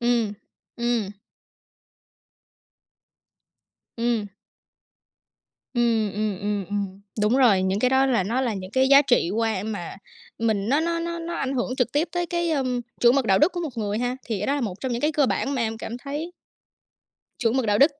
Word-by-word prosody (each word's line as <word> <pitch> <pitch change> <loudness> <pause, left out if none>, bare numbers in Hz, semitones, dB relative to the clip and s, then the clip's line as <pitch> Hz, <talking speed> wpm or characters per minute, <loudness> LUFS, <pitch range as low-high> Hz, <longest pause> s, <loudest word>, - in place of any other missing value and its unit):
ừm. 235 -3 +1 0.4
Ừm. 235 -4 0 2.9
Ừm. 230 -3 0 1.5
Ừm, 230 -3 +2
ừm, 210 -2 -2
ừm, 205 -2 -2
ừm. 200 -1 -4 0.2
Đúng 215 +5 +3
rồi, 225 -8 +5
những 190 +2 0
cái 250 - +3
đó 265 +1 +4
là 245 -8 +2
nó 235 +7 0
là 240 -4 0
những 185 -1 -7
cái 260 +2 +3
giá 280 +1 +8
trị 245 -10 +2
qua 220 -2 0
mà 205 -6 -5 0.4
mình 220 -2 0
nó 285 +4 +3
nó 335 +1 0
nó 340 0 -3
nó 335 +1 -5
ảnh 270 -3 -2
hưởng 250 0 -1
trực 250 -2 0
tiếp 295 +5 +1
tới 350 0 -1
cái, 345 -1 -1
ưm, 255 -4 0 0.2
chuẩn 240 +2 +6
mực 275 - +2
đạo 195 -3 +4
đức 315 +5 +4
của 350 - -4
một 295 -8 -5
người 210 -1 -1
ha. 245 +1 -1
Thì 220 -4 -2
cái 210 - -2
đó 280 - +2
là 290 - -2
một 210 -6 -2
trong 260 - -3
những 240 0 -2
cái 300 - +2
cơ 295 -2 +3
bản 275 +2 -1
mà 250 - 0
em 225 -1 -2
cảm 230 +1 -6
thấy 290 +6 -5 1.1
Chuẩn 235 +2 +1
mực 255 - +1
đạo 205 -1 +2
đức. 285 +6 +6
240 Hz, 195 wpm, -24 LUFS, 210-275 Hz, 2.9 s, giá